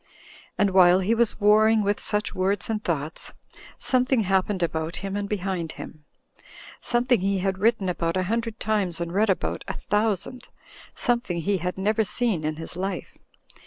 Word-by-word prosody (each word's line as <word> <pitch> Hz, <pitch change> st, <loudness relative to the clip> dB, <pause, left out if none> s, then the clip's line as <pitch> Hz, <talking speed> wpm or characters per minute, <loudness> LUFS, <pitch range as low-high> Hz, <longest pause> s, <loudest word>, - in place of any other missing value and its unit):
And 200 Hz, -1 st, +3 dB
while 180 Hz, -1 st, +6 dB
he 205 Hz, +5 st, +2 dB
was 230 Hz, -2 st, +1 dB
warring 215 Hz, +1 st, +5 dB
with 205 Hz, +1 st, 0 dB
such 210 Hz, 0 st, -1 dB
words 195 Hz, +3 st, 0 dB
and 215 Hz, -1 st, -2 dB
thoughts, 155 Hz, -2 st, -3 dB, 0.4 s
something 255 Hz, -1 st, +2 dB
happened 190 Hz, -1 st, +1 dB
about 160 Hz, 0 st, -2 dB
him 195 Hz, 0 st, -3 dB
and 205 Hz, 0 st, -3 dB
behind 185 Hz, -5 st, -2 dB
him; 155 Hz, -1 st, -10 dB, 0.7 s
something 240 Hz, -3 st, +2 dB
he 195 Hz, +1 st, +1 dB
had 190 Hz, 0 st, -1 dB
written 215 Hz, -2 st, +2 dB
about 170 Hz, -1 st, -1 dB
a 185 Hz, -, +1 dB
hundred 230 Hz, +3 st, -2 dB
times 200 Hz, -6 st, 0 dB
and 170 Hz, 0 st, -3 dB
read 210 Hz, +3 st, +2 dB
about 190 Hz, -, -1 dB
a -, -, -3 dB
thousand; 210 Hz, +3 st, -1 dB, 0.5 s
something 235 Hz, -9 st, 0 dB
he 200 Hz, +4 st, +1 dB
had 180 Hz, +1 st, -3 dB
never 215 Hz, +3 st, +1 dB
seen 210 Hz, -5 st, -1 dB
in 155 Hz, 0 st, -1 dB
his 160 Hz, +1 st, -8 dB
life. 190 Hz, 0 st, -4 dB
195 Hz, 165 wpm, -25 LUFS, 180-220 Hz, 0.7 s, while